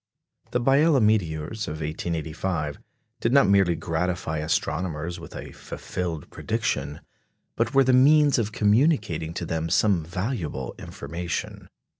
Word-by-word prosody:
The 125 - 0
Biela 140 +4 +4
meteors 100 -2 0
of - - -3
1885 80 0 -3 0.4
did 115 - 0
not 140 -6 +6
merely 95 -3 +4
gratify 80 -1 -2
astronomers 85 +2 -2
with 85 - -11
a - - -7
fulfilled 85 -4 -5
prediction, 75 -11 -2 0.5
but 115 +2 -1
were 135 - +7
the 130 0 +3
means 145 +2 +5
of 110 -2 -1
communicating 105 - +2
to 85 - -3
them 80 0 -2
some 95 -2 +3
valuable 90 - -3
information. 85 +1 -5
90 Hz, 125 wpm, -25 LUFS, 80-115 Hz, 0.5 s, were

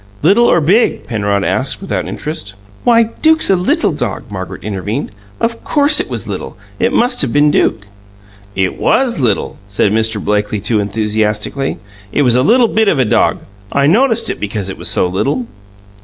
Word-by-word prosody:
"Little 200 +9 +4
or 170 - +3
big?" 195 +10 +2
Penrod 100 -3 -1
asked, 135 +6 -1
without 195 - -3
interest. 110 -11 -6 0.3
"Why, 235 -1 +5 0.2
Duke's 315 -6 +4
a - - +5
little 180 0 +1
dog!" - - -4
Margaret - - -7
intervened. 105 - -4 0.3
"Of 230 0 -2
COURSE, 295 0 +3
if - - -2
it - - -17
was - - -4
little, - - -6 0.2
it - - +1
must 245 +1 +1
have 135 -5 0
been 145 +2 +3
Duke." 110 -7 0 0.7
"It 95 -1 -1
WAS 255 - +1
little," 110 -6 -1
said 100 0 0
Mr. 110 0 0
Blakely 105 +1 -1
too 110 +2 0
enthusiastically. 105 +5 -1 0.3
"It 145 - +1
was 125 -3 +3
a 125 - +3
little 235 - +4
bit 220 0 +1
of 165 - +2
a 130 - +2
dog. 105 - +1 0.3
I 140 0 +2
noticed 225 - +2
it - - -7
because 100 -2 -4
it 95 - -6
was - - +1
so - - +4
little." 125 +8 -1
130 Hz, 185 wpm, -14 LUFS, -, 0.7 s, Why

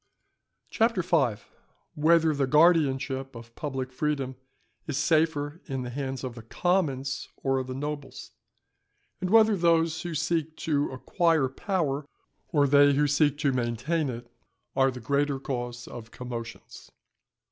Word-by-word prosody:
CHAPTER 225 -5 +2
V.—_Whether 155 - 0
the 140 -1 0
Guardianship 135 -4 +3
of 115 0 -11
public 130 -3 -4
Freedom 135 -1 -2 0.5
is 145 -4 -2
safer 155 0 +1
in 135 -1 -3
the 120 - -6
hands 135 0 -4
of 130 -2 -4
the 115 - -10
Commons 140 0 -1
or 135 -1 +1
of 130 - -4
the 130 - -5
Nobles; 145 0 -6 0.9
and 185 - -2
whether 220 0 +6
those 165 -2 +2
who 170 -2 -5
seek 160 0 -1
to 145 -3 0
acquire 160 +2 +1
Power 145 -2 -2 0.4
or 145 -2 +2
they 145 +1 +5
who 145 +2 +3
seek 145 0 +2
to 140 - +3
maintain 130 +6 -1
it 120 -1 -6 0.5
are 135 0 +4
the 125 -1 -6
greater 140 +3 0
cause 120 -2 -5
of 115 -2 -9
Commotions. 120 -1 -8
140 Hz, 135 wpm, -27 LUFS, 130-160 Hz, 0.9 s, whether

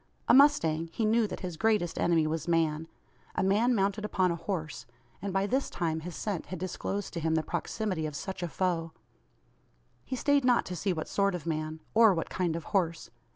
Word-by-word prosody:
A - - +6
mustang, 165 - +5
he 220 - -1
knew 220 +1 +3
that - - -7
his 180 -4 -5
greatest 210 -5 +1
enemy 165 -2 +3
was 160 +1 -2
man 160 -2 +1 0.5
a - - +1
man 220 +6 +3
mounted 200 +1 0
upon 185 -4 +1
a - - -1
horse; 165 -5 -4 0.3
and 200 +1 -3
by 195 +1 +1
this 265 +6 0
time 160 -3 -1
his 170 +2 -7
scent 200 -6 -3
had 185 - -5
disclosed 185 +3 -4
to 170 - -3
him 160 0 +1
the 160 - +1
proximity 185 -1 -2
of 150 - -7
such 190 +5 -5
a 175 - -1
foe. 170 -2 -1 1.1
He 260 - -4
stayed 285 +2 +2
not 250 -1 +3
to 180 - -5
see 185 +4 -1
what 160 -3 -3
sort 200 -2 +1
of 170 -3 -6
man, 155 -1 -3
or 220 -3 +6
what 165 - -3
kind 175 -3 0
of 165 - -4
horse. 165 - 0
180 Hz, 205 wpm, -29 LUFS, 160-205 Hz, 1.1 s, A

